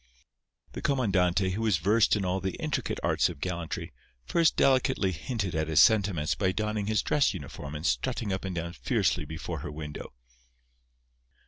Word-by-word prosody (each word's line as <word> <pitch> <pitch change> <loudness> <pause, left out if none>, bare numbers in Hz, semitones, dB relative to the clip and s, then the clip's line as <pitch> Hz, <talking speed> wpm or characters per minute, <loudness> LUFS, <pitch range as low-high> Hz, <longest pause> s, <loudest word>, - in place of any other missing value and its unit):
The - - -7
comandante, 95 -8 +1
who 100 +4 -3
was 110 -6 +2
versed 105 +8 +3
in 100 -2 -1
all 90 +1 0
the 95 -1 -3
intricate - - -2
arts - - +2
of 85 -5 -8
gallantry, 85 -1 -4 0.3
first 165 -2 +3
delicately 130 -7 +3
hinted 95 +2 -3
at 80 0 -1
his 80 -1 +3
sentiments 95 -8 +4
by 95 -2 0
donning 105 0 -2
his 110 0 +1
dress 140 -8 +2
uniform 70 -2 -7
and 75 +2 -5
strutting 115 -4 0
up 95 - -3
and 95 -2 -4
down 85 0 -4
fiercely - - 0
before 80 +1 -5
her 75 +1 -6
window. 75 -1 -7
95 Hz, 165 wpm, -28 LUFS, 85-110 Hz, 0.3 s, sentiments